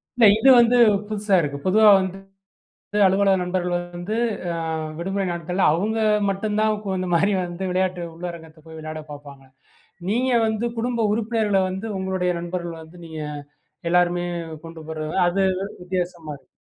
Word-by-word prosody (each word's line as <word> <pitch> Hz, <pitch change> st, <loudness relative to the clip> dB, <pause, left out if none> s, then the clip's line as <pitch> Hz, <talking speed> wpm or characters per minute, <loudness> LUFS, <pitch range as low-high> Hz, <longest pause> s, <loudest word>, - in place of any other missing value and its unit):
இல்ல 240 Hz, -2 st, +5 dB
இது 265 Hz, +5 st, +5 dB
வந்து 240 Hz, +1 st, +4 dB, 0.3 s
புதுசா 210 Hz, -2 st, +1 dB
இருக்கு. 140 Hz, -2 st, -3 dB
பொதுவா 215 Hz, +3 st, +6 dB
வந்து 190 Hz, 0 st, -3 dB, 0.9 s
அலுவலக 195 Hz, 0 st, +3 dB
நண்பர்கள் 180 Hz, 0 st, -1 dB, 0.2 s
வந்து, 175 Hz, +5 st, -4 dB, 0.4 s
ஆ -, -, -3 dB, 0.4 s
விடுமுறை 195 Hz, +3 st, -2 dB
நாட்கள்ல 175 Hz, +2 st, -2 dB
அவங்க 210 Hz, +7 st, -1 dB, 0.3 s
மட்டும் 210 Hz, +2 st, -1 dB
தான், 215 Hz, 0 st, +2 dB
குழு 185 Hz, -2 st, -2 dB
மாரி 195 Hz, +5 st, +3 dB
வந்து 175 Hz, +1 st, -5 dB
விளையாட்டு 185 Hz, -1 st, 0 dB
உள்ளரங்கத்தை 165 Hz, -2 st, -8 dB
போய் 160 Hz, 0 st, -10 dB
விளையாடப் 155 Hz, 0 st, -7 dB
பார்ப்பாங்க. 145 Hz, -2 st, -11 dB, 0.6 s
நீங்க 250 Hz, +5 st, +1 dB
வந்து 220 Hz, +1 st, -1 dB
குடும்ப 235 Hz, -1 st, 0 dB
உறுப்பினர்கள 215 Hz, -2 st, +1 dB
வந்து 190 Hz, +4 st, -5 dB
உங்களுடைய 190 Hz, -1 st, -1 dB
நண்பர்கள் 170 Hz, -1 st, -5 dB
வந்து 160 Hz, +3 st, -15 dB
நீங்க, 160 Hz, -1 st, -7 dB, 0.7 s
எல்லோருமே 175 Hz, 0 st, +2 dB, 0.4 s
கொண்டு 165 Hz, -1 st, -10 dB
போறது, 155 Hz, -1 st, -4 dB, 0.2 s
அது 185 Hz, +3 st, 0 dB, 0.2 s
வு 195 Hz, -, -2 dB, 0.2 s
வித்தியாசமா 175 Hz, -3 st, -4 dB
இருக்கு. 140 Hz, -, -23 dB
185 Hz, 145 wpm, -23 LUFS, 170-205 Hz, 0.9 s, பொதுவா